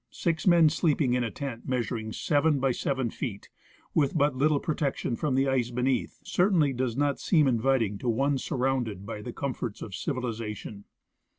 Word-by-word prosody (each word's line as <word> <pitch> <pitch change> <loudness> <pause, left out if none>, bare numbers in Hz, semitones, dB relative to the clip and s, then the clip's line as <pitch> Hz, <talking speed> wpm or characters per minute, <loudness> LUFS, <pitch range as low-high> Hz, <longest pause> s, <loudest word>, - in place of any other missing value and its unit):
Six 165 +1 -2
men 170 -3 +7
sleeping 150 -5 +1
in 125 -1 +1
a 115 - -1
tent 120 0 -6
measuring 115 -3 -2
seven 145 +4 +2
by 135 0 +2
seven 130 -1 -1
feet, 105 -7 -6 0.4
with 150 0 +2
but 145 -2 +2
little 145 +2 +2
protection 140 -5 -1
from 145 +1 -1
the 135 +1 +2
ice 130 -3 +1
beneath, 125 +2 -1
certainly 175 -7 +2
does 125 -1 -2
not 145 0 +1
seem 155 -6 +3
inviting 115 -4 +1
to 125 - -2
one 135 +4 +1
sur 145 - -4
rounded 125 -7 -1
by 105 0 -6
the 120 - -6
comforts 125 -6 -4
of 100 - -8
civilization. 110 - -4
130 Hz, 175 wpm, -28 LUFS, 115-145 Hz, 0.4 s, men